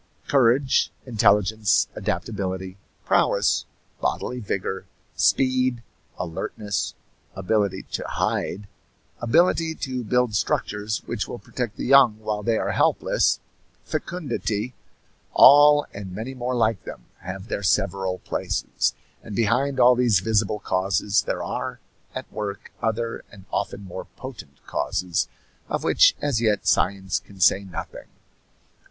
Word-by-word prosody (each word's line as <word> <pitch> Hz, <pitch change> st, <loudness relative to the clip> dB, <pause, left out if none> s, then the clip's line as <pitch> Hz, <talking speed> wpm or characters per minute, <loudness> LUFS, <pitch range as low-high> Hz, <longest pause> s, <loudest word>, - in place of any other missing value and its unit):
Courage, 130 Hz, 0 st, +3 dB
intelligence, 105 Hz, -3 st, +3 dB
adaptability, 95 Hz, -3 st, -3 dB, 0.3 s
prowess, -, -, +2 dB, 0.3 s
bodily 125 Hz, -, -2 dB
vigor, 95 Hz, -3 st, -3 dB, 0.3 s
speed, 130 Hz, -2 st, +2 dB, 0.3 s
alertness, 90 Hz, +3 st, -3 dB, 0.4 s
ability 95 Hz, 0 st, 0 dB
to -, -, -2 dB
hide, 100 Hz, +2 st, -2 dB, 0.5 s
ability 165 Hz, +5 st, +2 dB
to 130 Hz, -4 st, -4 dB
build 125 Hz, 0 st, +1 dB
structures 105 Hz, +1 st, -1 dB
which 120 Hz, -3 st, -3 dB
will -, -, -6 dB
protect 120 Hz, -2 st, -5 dB
the -, -, -4 dB
young 130 Hz, -5 st, +6 dB
while 110 Hz, -1 st, -3 dB
they 115 Hz, +1 st, +1 dB
are -, -, -1 dB
helpless, -, -, +2 dB, 0.5 s
fecundity 125 Hz, -, -3 dB, 0.6 s
all, 145 Hz, +2 st, +8 dB
and 100 Hz, -2 st, -7 dB
many 110 Hz, +8 st, -5 dB
more 125 Hz, 0 st, -3 dB
like 110 Hz, -3 st, +1 dB
them, -, -, -9 dB, 0.2 s
have 95 Hz, +2 st, -7 dB
their 100 Hz, -, -3 dB
several 95 Hz, -1 st, +1 dB
places; -, -, -2 dB, 0.3 s
and 105 Hz, -, -8 dB
behind 125 Hz, +5 st, +1 dB
all 125 Hz, 0 st, +7 dB
these 120 Hz, -5 st, +3 dB
visible 105 Hz, 0 st, +1 dB
causes 100 Hz, +1 st, +1 dB
there -, -, -2 dB
are -, -, -4 dB, 0.4 s
at -, -, -4 dB
work 100 Hz, -2 st, -5 dB
other 115 Hz, +1 st, -2 dB
and 95 Hz, -2 st, -14 dB
often -, -, -2 dB
more 95 Hz, -1 st, -7 dB
potent 115 Hz, -, -10 dB
causes 90 Hz, -2 st, -1 dB, 0.4 s
of -, -, -2 dB
which -, -, +5 dB
as 140 Hz, -6 st, +1 dB
yet 105 Hz, -3 st, +1 dB
science 95 Hz, 0 st, +1 dB
can 100 Hz, -1 st, -17 dB
say 95 Hz, +2 st, +4 dB
nothing. 95 Hz, -, -8 dB
110 Hz, 120 wpm, -24 LUFS, 100-125 Hz, 0.6 s, all